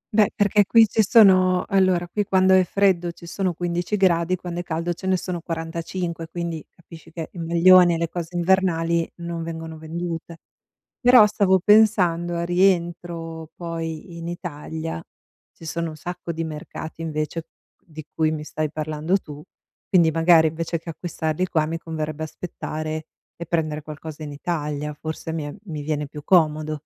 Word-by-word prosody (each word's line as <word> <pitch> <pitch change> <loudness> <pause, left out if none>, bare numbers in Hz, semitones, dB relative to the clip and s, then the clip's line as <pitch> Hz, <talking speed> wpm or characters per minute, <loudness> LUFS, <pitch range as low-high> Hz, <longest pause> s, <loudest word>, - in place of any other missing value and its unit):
Beh, 215 0 +5
perché 205 -1 +3
qui 230 -1 +7
ci 220 - +2
sono 185 -4 +5
allora 185 -3 +2
qui 205 +4 -1
quando 190 -1 +3
è 185 0 +6
freddo 180 -3 +2
ci 170 - -14
sono 185 +1 -2
15 175 +4 -2
gradi, 180 -2 +2
quando 175 -1 -6
è - - -3
caldo 170 +1 -2
ce 190 +3 -8
ne 185 -1 +3
sono 180 -1 -4
45, 165 +1 -4
quindi 170 -1 -4
capisci 165 -1 -15
che 165 -1 -6
il 175 - -8
maglione 175 +1 +6
e - - -2
le 170 0 -1
cose 175 0 -6
invernali 170 -2 +1
non 170 -1 -4
vengono 160 -1 -6
vendute. 165 +1 -5 0.6
Però 245 -3 +7
stavo 195 -2 +3
pensando, 185 -6 +4
al 170 0 -2
rientro 170 -3 0
poi 165 0 -6
in 170 0 -7
Italia, 160 - -5 0.5
ci 165 - -12
sono 165 0 -3
un 155 - -10
sacco 175 +1 -6
di 165 +1 -3
mercati 160 +1 -7
invece 155 +1 -3 0.4
di 155 -2 -10
cui 155 -1 +2
mi 155 -1 -3
stai 155 0 -3
parlando 155 +4 -1
tu, 150 -3 -11 0.4
quindi 170 -4 +4
magari, 165 0 +5
invece 165 +1 -2
che 165 - -14
acquistarli 160 0 -2
qua, 155 -3 +1
mi 165 +1 -3
converrebbe 155 -2 -5
aspettare 155 -1 -5 0.3
e 170 - -6
prendere 155 -2 -1
qualcosa 155 +1 -8
in 145 -1 -6
Italia, 150 -1 -3
forse 160 +1 -6
mi 160 - -2
è 145 - -6
mi 155 -6 -6
viene 150 0 -2
più 150 +1 -10
comodo. 155 -3 +2
170 Hz, 170 wpm, -23 LUFS, 160-180 Hz, 0.6 s, qui